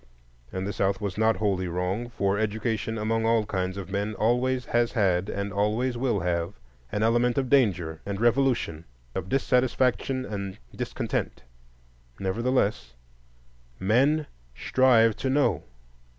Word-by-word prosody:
And 95 0 -3
the 100 - -3
South 95 0 0
was 100 -3 -3
not 110 +1 +3
wholly 95 -3 0
wrong; 90 +7 -2
for 100 -4 0
education 110 +1 -1
among 110 +1 0
all 115 -1 +2
kinds 95 -2 -2
of 95 -1 -7
men 105 +2 -2
always 125 +3 +1
has 120 0 +1
had, 95 -4 +1
and 100 -1 -3
always 110 +5 0
will 120 -5 0
have, 85 +1 -1 0.4
an 105 +1 0
element 120 +2 +2
of 130 -3 0
danger 90 - +2
and 100 -1 -4
revolution, 120 - +1 0.3
of 95 - -4
dissatisfaction 130 0 +1
and 100 -3 -5 0.2
discontent. - - -3 0.7
Nevertheless, 100 - 0 0.8
men 135 +10 +3 0.3
strive 115 - +4
to 130 - -2
know. 135 -2 +1
110 Hz, 135 wpm, -26 LUFS, 95-120 Hz, 0.8 s, strive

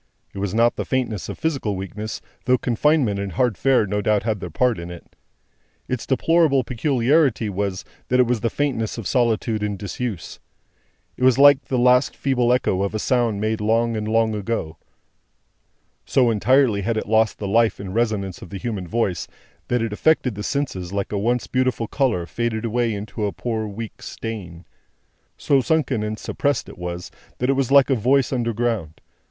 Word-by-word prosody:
It - - -7
was 100 +1 -2
not 120 +1 +3
the - - -1
faintness 120 -7 -2
of - - -6
physical 135 -10 -1
weakness, 105 +3 -6 0.2
though 130 +1 +4
confinement 125 -3 +1
and 100 -2 -4
hard 120 +2 +1
fare 135 -2 +3
no 105 +1 -1
doubt 105 -1 +1
had 110 -2 -1
their - - -6
part 125 -6 +1
in 85 0 -7
it. 85 -1 -12 0.7
Its 130 -2 -3
deplorable 145 -1 +3
peculiarity 130 -1 +1
was, 100 -1 -3 0.2
that 125 - +2
it 125 - +6
was 120 -2 -1
the 115 - +1
faintness 130 -7 -2
of 115 - -4
solitude 115 -3 +1
and 105 -1 -2
disuse. 100 -1 -5 0.8
It 125 - -4
was 130 -1 +5
like 140 -2 +6
the 130 - -1
last 125 +2 +4
feeble 125 -3 +1
echo 110 -6 +1
of 100 +2 -2
a - - +1
sound 115 -2 +1
made 110 0 -1
long 115 +2 +1
and 105 -1 -3
long 110 0 +2
ago. 105 -6 -3 1.3
So 125 -3 +3
entirely 115 0 +3
had 110 +3 -1
it - - -3
lost 110 0 +2
the 100 - -4
life 115 +2 +2
and 95 -2 -6
resonance 105 -5 -1
of - - -10
the 100 - -6
human 105 -5 -4
voice, 90 - -1 0.4
that 120 -1 0
it 110 -2 -3
affected 135 0 +2
the 105 - -6
senses 105 -9 -3
like 100 -1 -3
a 105 - -1
once 120 +4 0
beautiful 130 -3 0
colour 110 -8 0
faded 115 +3 -2
away 115 +1 0
into 105 +1 -3
a - - -2
poor 110 -1 -3
weak 110 +2 -7
stain. 90 -7 -7 0.7
So 140 -2 +2
sunken 135 -4 0
and 105 0 -3
suppressed 145 +5 -1
it - - -12
was, 90 0 -5 0.3
that 125 +2 +1
it - - +3
was 135 -2 0
like 140 0 +6
a - - +4
voice 130 +4 +2
underground. 115 - -1
115 Hz, 185 wpm, -22 LUFS, 105-125 Hz, 1.3 s, it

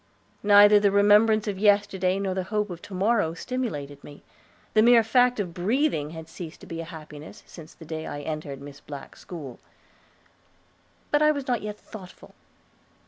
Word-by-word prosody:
Neither 205 0 +7
the 205 0 +3
remembrance 210 +2 +4
of 195 -2 -3
yesterday 200 -3 +2
nor 195 -1 -2
the 185 -1 -3
hope 210 -1 -2
of 175 -1 -8
to 195 - -9
morrow 195 -4 +1
stimulated 150 - -5
me. 145 - -13 0.5
The 215 - +5
mere 235 0 +6
fact 245 +1 +2
of 180 -4 -3
breathing 190 - 0
had 160 0 -9
ceased 165 -1 -10
to - - -11
be 165 0 -6
a - - -7
happiness, 155 -2 -11
since 160 -2 -13
the 165 - -13
day 160 0 -6
I 145 - -6
entered 145 -2 -6
Miss 145 0 -11
Black's 145 -2 -10
school. 145 -9 -9 1.5
But 295 - +3
I 305 - +5
was 285 -3 -2
not 245 -3 0
yet 210 0 -6
thoughtful. 190 -5 -13
190 Hz, 175 wpm, -25 LUFS, 160-215 Hz, 1.5 s, Neither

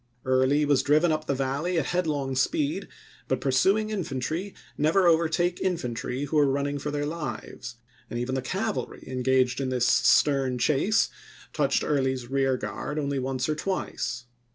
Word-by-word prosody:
Early 130 +3 +3
was 145 -2 +3
driven 155 +4 +3
up 155 0 -2
the 140 - +1
Valley 140 +7 -1
at 155 - +1
headlong 150 -7 -1
speed, 300 - 0 0.4
but - - 0
pursuing 190 +11 +2
infantry 165 0 -3 0.2
never 165 +6 +3
overtake 170 +1 +2
infantry 130 -6 -2
who 150 +2 +1
are 145 -2 +4
running 140 +1 -1
for 150 - -4
their 145 0 -2
lives, 150 -5 -6 0.3
and 120 - -4
even 125 +2 -2
the 130 - 0
cavalry 200 - -3
en 130 -1 -4
gaged 130 0 +2
in 130 - -1
this 125 -2 +1
stern 135 -2 +3
chase 155 - +2 0.4
touched 140 -3 +1
Early's 130 -3 -1
rear 135 -1 +2
guard 150 +3 -5
only 140 -2 -1
once 130 0 -2
or 155 - +1
twice. 150 -7 -3
145 Hz, 160 wpm, -26 LUFS, 130-165 Hz, 0.4 s, are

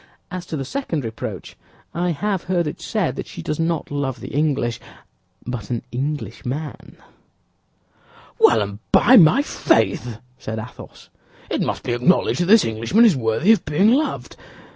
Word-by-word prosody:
As 185 -2 -6
to 160 - -4
the 135 - -4
second 165 - -3
reproach, 115 0 -6 0.4
I 175 +1 -1
have 195 +3 -2
heard 175 -2 0
it 150 - -5
said - - -1
that - - -5
she 85 - -9
does 150 - -3
not 165 -2 -1
love 135 -4 -2
the - - -8
English, 140 -5 0 0.7
but 120 -5 -5
an 120 -2 -3
Englishman." 135 +1 -5 1.4
"Well, 110 -2 +5
and 100 0 -7
by 260 - +6
my 185 - +6
faith," 110 - 0 0.2
said 110 - -5
Athos, 110 +3 -10 0.4
"it - - 0
must - - -2
be - - -2
acknowledged 125 +8 +2
that - - +1
this 220 +2 +6
Englishman 115 - +2
is 210 -8 +5
worthy 125 - +2
of 220 -6 +3
being 160 +9 +3
loved. 305 +4 -2
145 Hz, 160 wpm, -21 LUFS, 120-180 Hz, 1.4 s, by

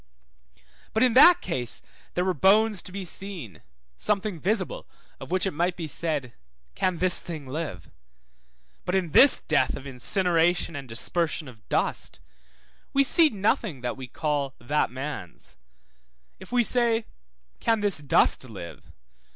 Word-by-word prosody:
But 220 - +2
in 250 -2 +3
that 345 +7 +7
case 125 -9 -1 0.3
there 180 - 0
were 185 - +1
bones 205 +4 +3
to - - -9
be 195 0 -6
seen, 170 - -7 0.4
something 205 -3 -1
visible, 225 - -2 0.3
of - - -9
which 185 +1 +1
it 195 - -2
might 175 +3 0
be 170 - -4
said, 150 -5 -3 0.4
Can 185 - -1
this 180 +1 +3
thing 160 -5 -7
live? 130 - -6 0.9
But 180 - -2
in 180 -4 -1
this 270 - +7
death 130 - +1
of 135 - -11
incineration 170 - +1
and 135 -3 -7
dispersion 155 +6 0
of 110 -4 -15
dust, - - -2 0.7
we 275 0 +4
see 315 +3 +5
nothing 205 - -1
that 125 -1 -3
we 130 -1 -8
call 145 -1 -2
that 145 +5 -1
man's. 130 - -8 0.8
If - - -13
we 245 -1 +3
say, 235 -1 +1 0.5
Can 225 -2 +1
this 205 -6 +1
dust 135 -2 +2
live? 95 -6 -10
175 Hz, 145 wpm, -25 LUFS, 135-205 Hz, 0.9 s, that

